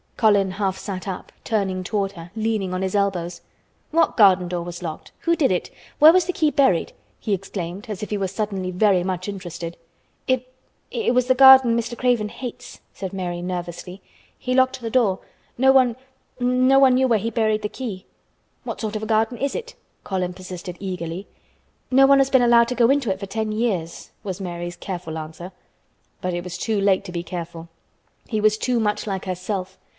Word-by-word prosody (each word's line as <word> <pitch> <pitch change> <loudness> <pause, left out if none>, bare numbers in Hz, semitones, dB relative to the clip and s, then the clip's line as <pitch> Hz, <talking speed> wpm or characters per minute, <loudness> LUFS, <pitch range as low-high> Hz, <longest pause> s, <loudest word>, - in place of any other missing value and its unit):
Colin 205 -4 +3
half 190 -1 -2
sat 190 -1 -6
up, 190 -2 -6
turning 190 -4 -1
toward 195 0 -1
her, 170 -3 -11
leaning 215 -4 -1
on 185 - -2
his 190 - -2
elbows. 180 -4 -1 0.5
"What 330 +1 +2
garden 190 -4 +6
door 175 0 -3
was 175 +1 -7
locked? 160 -2 -6
Who 335 0 +2
did 280 - +2
it? 180 - -1 0.3
Where 310 +2 +8
was 365 -1 +4
the 365 - -2
key 310 -3 +2
buried?" 265 - +2 0.3
he 210 - -2
exclaimed 190 -1 -5
as 210 -1 -5
if 210 - -6
he 210 - 0
were 195 - 0
suddenly 195 -1 -3
very 185 0 +3
much 185 0 -3
interested. 175 -4 -6 0.5
"It—it 255 - -3
was 250 -1 +3
the 255 - +4
garden 260 -2 +8
Mr. 235 +1 -3
Craven 240 -4 +1
hates," 245 +1 -8
said 190 -1 -6
Mary 175 -2 -3
nervously. 180 +1 -5 0.4
"He 255 - -2
locked 260 0 +3
the 225 -1 -4
door. 215 -7 +2 0.4
No 265 +2 +5
one—no 255 0 +1
one 265 -2 +6
knew 260 +1 +3
where 230 -3 +3
he 225 +3 -3
buried 215 -1 +1
the 210 - -1
key." 205 -7 -6 0.6
"What - - -6
sort 220 -1 -3
of 215 - -2
a 220 - -4
garden 225 +2 +1
is 280 +1 -1
it?" 485 0 -5 0.3
Colin 185 -2 -2
persisted 180 -1 -8
eagerly. 180 -1 -5 0.6
"No 270 +1 +6
one 275 0 +6
has 270 0 +3
been 260 -2 +4
allowed 235 -1 +5
to 250 - -3
go 240 +1 +4
into 275 -7 +1
it 190 - -3
for 200 - -5
ten 220 +2 -2
years," 210 -7 -2
was 195 -1 -5
Mary's 175 -1 -5
careful 175 -4 -6
answer. 160 +3 -8 0.7
But 180 -1 -2
it 175 - -3
was 180 0 -7
too 220 -2 0
late 195 -1 +2
to - - -7
be 170 -1 -4
careful. 170 -1 -7 0.6
He 215 - -1
was 215 0 +4
too 245 +2 0
much 210 -1 -1
like 195 -2 -3
herself. 185 +1 -4
205 Hz, 195 wpm, -22 LUFS, 185-245 Hz, 0.7 s, Where